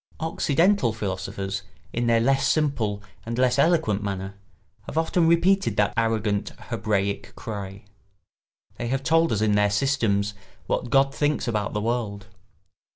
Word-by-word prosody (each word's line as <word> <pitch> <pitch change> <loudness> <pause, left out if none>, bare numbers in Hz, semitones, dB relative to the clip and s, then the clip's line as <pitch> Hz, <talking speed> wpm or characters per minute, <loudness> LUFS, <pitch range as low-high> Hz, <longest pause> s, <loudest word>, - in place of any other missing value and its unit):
Occidental 160 - +2
philosophers, 95 -1 -4 0.3
in 120 0 0
their 115 -1 +4
less 135 +4 +2
simple 115 -10 0 0.2
and 115 +2 -4
less 125 +1 +2
eloquent 140 - +2
manner, 95 -1 -4 0.5
have - - -6
often 165 +1 +2
repeated 190 +4 +3
that 105 -1 +2
arrogant 110 -3 0 0.2
Hebraic 105 -4 -1
cry: 100 -3 -7 1.0
they 120 - -2
have 135 +2 -1
told 165 +2 +3
us 105 - 0
in 110 -1 +2
their 105 0 +3
systems 105 -3 +1 0.3
what 120 - -2
God 135 +2 +3
thinks 145 -1 0
about 105 -3 -1
the 105 - -1
world. 110 -3 -2
115 Hz, 140 wpm, -25 LUFS, 100-140 Hz, 1.0 s, their